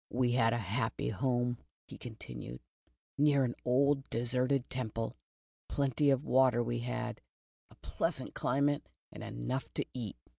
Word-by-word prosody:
"We 125 -1 +2
had 115 -2 +4
a 120 - +1
happy 110 +3 -1
home," 120 +1 0 0.3
he - - -10
continued, - - -8 0.6
"near 145 -2 +5
an 120 -2 0
old 135 +2 +3
deserted 125 +3 +1
temple. 115 -3 -3 0.5
Plenty 140 +1 +2
of 135 +2 +3
water 125 -2 +5
we 120 0 -1
had, 125 0 -3 0.5
a - - -18
pleasant - - -1
climate 140 +2 +1 0.2
and - - -8
enough 130 - -3
to - - 0
eat. 115 - -5
125 Hz, 140 wpm, -33 LUFS, 120-135 Hz, 0.6 s, near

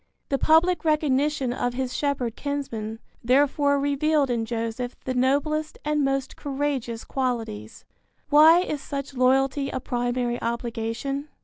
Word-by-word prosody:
The 275 - 0
public 325 +1 +4
recognition 295 -4 +1
of 245 -1 -2
his 255 -1 -3
shepherd 260 -5 -1
kinsmen, 235 -7 -4 0.3
therefore, 285 +3 +3
revealed 285 0 +1
in 230 -2 -1
Joseph 230 +2 -3
the 260 - -1
noblest 290 +5 0
and 300 -1 +1
most 270 -1 -1
courageous 270 -5 -3
qualities. 230 - -4 0.5
Why 315 +4 +7
is 300 -6 -3
such 275 0 -5
loyalty 270 +2 +2
a 260 - -3
primary 245 0 -2
obligation? 235 +4 -3
270 Hz, 125 wpm, -25 LUFS, 245-290 Hz, 0.5 s, Why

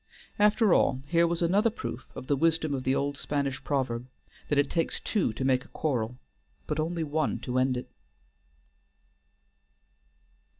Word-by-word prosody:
After 210 -1 +5
all, 130 0 +2
here 170 +3 +3
was 170 0 0
another 200 +7 +3
proof 120 - -6
of - - -7
the 145 - +2
wisdom 160 0 +1
of 130 -2 -2
the 130 +1 +2
old 140 0 -1
Spanish 140 -2 -2
proverb, 125 -4 -1 0.4
that 145 - +2
it 145 0 +4
takes 165 -1 0
two 200 - 0
to 130 - -3
make 130 -1 +2
a - - -17
quarrel, 125 -5 -2 0.5
but 150 - -2
only 165 +1 -1
one 155 0 0
to 130 0 -1
end 130 0 +2
it. 125 - -5
145 Hz, 160 wpm, -28 LUFS, 130-165 Hz, 0.5 s, After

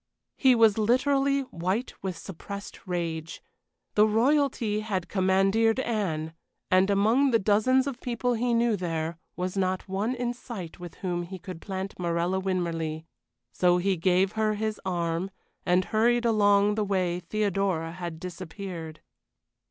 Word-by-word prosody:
He 260 -2 +5
was 225 -2 +5
literally 275 +5 +2
white 195 0 -2
with 185 -3 -4
suppressed 200 +2 -8
rage. 165 -3 -3 0.5
The 210 +1 +5
Royalty 235 -2 +2
had 200 -5 -2
commandeered 195 +5 +2
Anne, 180 -11 -2 0.4
and 185 +1 +4
among 220 +8 +3
the 235 - +4
dozens 220 +6 +3
of 270 -3 -5
people 245 0 -1
he 240 +1 +1
knew 230 -1 +3
there 165 -3 -3 0.2
was 180 +1 -3
not 185 0 -1
one 200 +6 -1
in 245 -1 -2
sight 210 -10 -8
with 175 -2 -9
whom 175 -1 -1
he 180 +2 -7
could 180 -2 -9
plant 190 -1 -5
Morella 175 +2 0
Winmarleigh; 165 -4 -2 0.5
so 180 -1 +3
he 190 +2 +1
gave 185 +2 +2
her 215 -1 0
his 215 0 -3
arm, 175 -1 -1 0.4
and 180 +1 +3
hurried 240 +2 +3
along 205 -2 +4
the 215 0 0
way 185 -3 0
Theodora 190 -3 -1
had 170 -2 -6
disappeared. 175 -2 -7
195 Hz, 145 wpm, -27 LUFS, 175-225 Hz, 0.5 s, He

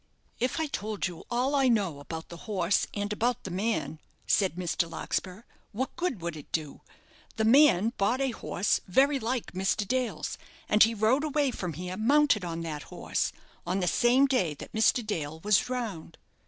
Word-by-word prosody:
"If 255 +6 0
I 320 - +1
told 215 -7 -3
you 175 -3 -6
all 250 +4 0
I 275 -2 +3
know 200 - +1
about 160 +3 -7
the 170 - -9
horse 190 -2 +1
and 205 0 -2
about 240 +3 0
the 190 - -6
man," 195 -4 -2 0.3
said 190 -5 +2
Mr. 175 -1 -1
Larkspur, 185 +4 -4 0.3
"what 260 +6 -3
good 345 - -2
would 170 -1 -3
it 150 - -11
do? 155 -3 -3 0.5
The 220 - 0
man 230 -4 +5
bought 215 +6 +2
a 270 -1 +1
horse 205 -3 0
very 275 +9 +3
like 240 +1 -2
Mr. 195 +2 0
Dale's, 255 0 -2 0.3
and 210 - +3
he 225 +1 +6
rode 225 +7 +2
away 295 -3 +1
from 180 -7 -4
here 180 +4 -5
mounted 275 -1 +3
on 165 -1 -4
that 155 -3 -4
horse, - - -2 0.3
on 180 +3 -1
the 180 - 0
same 250 +7 +4
day 195 - +1
that - - -11
Mr. 220 +1 +3
Dale 160 -7 -3
was 205 +1 +4
drowned. 225 -11 -5
210 Hz, 180 wpm, -28 LUFS, 180-250 Hz, 0.5 s, he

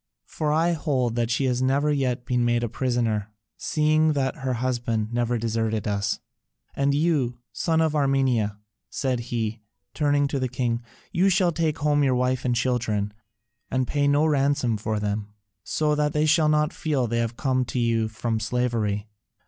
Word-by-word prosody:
For 150 -1 -2
I 165 +3 +3
hold 140 -7 0
that 120 -1 0
she 125 +3 +1
has 125 -1 0
never 140 +3 +2
yet 130 -4 -1
been 125 -1 +1
made 120 0 +1
a - - 0
prisoner, 115 -4 -1 0.2
seeing 155 0 +2
that 135 +1 -1
her 135 -2 -2
husband 120 -3 -1
never 120 0 +1
deserted 110 -2 -1
us. 100 -1 0 0.6
And 140 0 +1
you, 145 -6 +1 0.2
son 160 -1 +1
of 160 -1 +1
Armenia," 135 -7 +1 0.3
said 130 -3 -1
he, 110 -2 -2 0.3
turning 145 -1 +2
to 140 - -1
the 130 -1 -1
king, 120 -2 -1 0.3
"you 185 +3 +3
shall 185 -2 +3
take 160 -2 0
home 145 0 +2
your 130 -2 +3
wife 125 0 0
and 125 -1 +2
children, 110 -4 0 0.6
and 130 0 0
pay 145 -1 +1
no 145 +2 +3
ransom 140 -5 +2
for 105 0 -2
them, 105 0 -3 0.3
so 150 -1 0
that 150 0 +1
they 150 0 +2
shall 155 0 +4
not 150 0 +2
feel 145 -5 0
they 115 0 0
come 130 -2 +1
to 125 - -5
you 115 -2 +1
from 110 +1 -2
slavery. 110 -3 -1
130 Hz, 175 wpm, -25 LUFS, 115-145 Hz, 0.6 s, shall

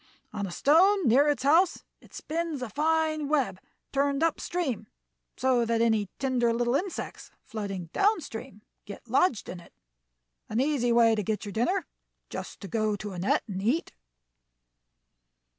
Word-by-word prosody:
On 200 -2 -3
a - - -7
stone 345 - +4
near 275 +6 +5
its 285 -4 0
house 330 +6 +3 0.2
it - - -20
spins 320 -4 -3
a 245 - -5
fine 310 +1 +1
web, 275 -10 0 0.3
turned 280 +2 +1
up 330 -2 +1
stream, 325 - -3 0.5
so 255 -2 +2
that 230 0 0
any 220 -4 +2
tender 250 -3 +1
little 240 +1 0
insects 355 +7 -3
floating 200 -5 -5
down 415 +1 +3
stream 220 - -9 0.2
get 205 +3 -10
lodged 255 - +2
in 180 - -7
it. 175 - -17 0.8
An 220 - -1
easy 265 -3 +1
way 230 -1 +5
to 215 - 0
get 210 +2 -2
your 205 - -5
dinner 350 - 0 0.5
just - - -7
to 200 - -6
go 215 0 0
to 205 0 -6
a 180 - -6
net 185 - +1
and 190 -2 -4
eat." 250 +11 0
250 Hz, 160 wpm, -28 LUFS, 215-305 Hz, 0.8 s, near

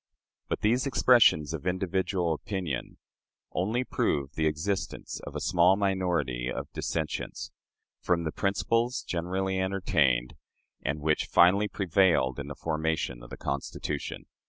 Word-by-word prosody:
But - - -2
these 125 +5 +2
expressions 115 - +4
of 80 +2 -5
individual 95 -1 0
opinion 85 - -4 0.5
only 110 +8 0
prove 70 - -1
the 80 -1 +1
existence 80 +6 -3
of - - -8
a - - -1
small 90 +2 +4
minority 90 -11 0
of - - -5
dissentients 80 -2 -3 0.5
from 85 -2 +1
the 80 - -2
principles 115 +7 0
generally 95 +2 -2
entertained, 75 -10 +1 0.5
and 75 +2 -2
which 80 +1 +1
finally 95 +4 +5
prevailed 90 -9 +2
in 70 - -5
the 70 - -6
formation 80 -6 -2
of - - -12
the - - -8
Constitution. 70 0 -4
85 Hz, 130 wpm, -28 LUFS, 75-95 Hz, 0.5 s, finally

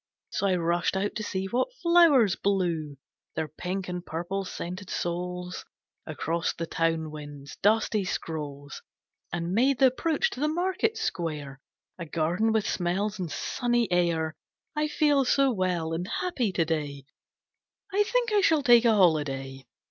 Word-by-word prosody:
So 200 - 0
I 185 - +3
rushed 175 +2 0
out 200 +2 -1
to - - -4
see 190 -2 -3
what 245 - 0
flowers 330 - +6
blew 170 -7 -1 0.4
Their 155 - -1
pink 180 +5 -4
and 180 -1 -4
purple 175 +5 -3
scented 185 +2 -6
souls 180 +1 -3 0.4
Across 165 +1 -1
the 165 - -4
town 165 -1 -1
wind's 145 -2 -9
dusty 215 0 +2
scrolls, 145 -5 -5 0.5
And 170 0 -2
made 260 +5 +3
the 270 - +5
approach 325 - +1
to - - -7
the 300 - +1
Market 370 +7 0
Square 150 -5 -3 0.4
A 170 - -5
garden 175 +8 +1
with 220 -2 +1
smells 195 +4 -1
and 175 -4 -3
sunny 240 - 0
air. 165 -3 +1 0.4
I 300 0 +1
feel 295 -2 +3
so 270 +1 +3
well 180 -6 -1
and 175 +3 -3
happy 285 - -1
to 170 -3 +1
day, 145 -4 -3 0.9
I 405 - +3
think 465 +1 +1
I 410 - +4
shall 320 -5 +3
take 240 -2 +6
a 225 -2 +5
Holiday. 135 -7 +1
180 Hz, 155 wpm, -27 LUFS, 165-240 Hz, 0.9 s, flowers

